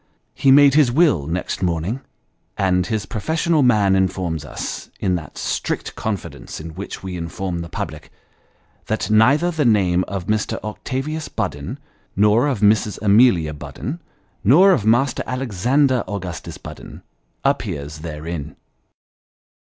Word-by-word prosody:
He 135 - +2
made 140 0 +7
his 145 -4 +4
will 140 - +3
next 90 +3 -3
morning, 90 +8 -1 0.6
and 90 -2 +1
his 110 0 -2
professional 160 - 0
man 105 -7 +4
informs 90 -4 -1
us, 70 - -6
in 95 -2 0
that 80 -5 -5
strict - - -3
confidence 100 -5 -5
in 80 +1 -7
which 95 +4 -7
we 95 -1 -5
inform 85 +1 -4
the 85 0 -6
public, - - -6 0.8
that 110 0 -1
neither 140 +11 +4
the 160 -3 0
name 95 -7 +3
of 95 -3 -4
Mr. 105 +1 -1
Octavius 135 +8 -4
Budden, - - -4 0.4
nor 105 +6 +4
of 130 -8 -1
Mrs. 105 0 +3
Amelia 100 -7 +4
Budden, 135 - -6 0.4
nor 165 - +6
of 110 - +1
Master 120 +4 +3
Alexander 130 +2 +1
Augustus 90 -5 -6
Budden, - - -11 0.4
appears 80 - -1
therein. 80 -1 -6
105 Hz, 130 wpm, -21 LUFS, 90-130 Hz, 0.8 s, made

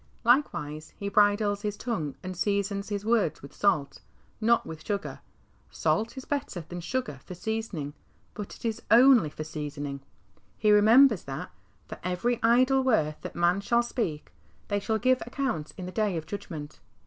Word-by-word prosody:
Likewise 155 - +1
he 200 - -3
bridles 205 0 +3
his 210 -1 -3
tongue 160 - -3
and 185 0 -5
seasons 200 +1 -1
his 205 0 -3
words 220 -12 +1
with 140 - -11
salt, 155 -9 0 0.4
not 235 +2 +3
with 160 -1 -8
sugar; 205 -2 -3 0.5
salt 225 +4 0
is 265 - -7
better 275 -11 -3
than 175 +2 -8
sugar 175 - -3
for 180 - -9
seasoning, 195 -8 -4 0.4
but 210 -2 -7
it - - -11
is 225 -2 -2
07ily 240 - +6
for 155 - -6
seasoning. 145 -2 -5 0.6
He 210 0 +3
remembers 220 +1 +6
that, 135 -1 -6 0.2
" 100 0 -37
For - - -8
every 185 +7 0
idle 255 +3 +4
word 160 -13 +1
that - - -7
man 175 +3 +2
shall 235 +4 +2
speak, 205 - -3 0.4
they 205 -1 +1
shall 220 +2 0
give 255 +4 +2
account 240 - -2
in 185 - -6
the 180 - -6
day 210 -3 0
of 160 - -5
judg 205 +3 -6
ment." 150 -4 -7
205 Hz, 170 wpm, -28 LUFS, 160-230 Hz, 0.6 s, 07ily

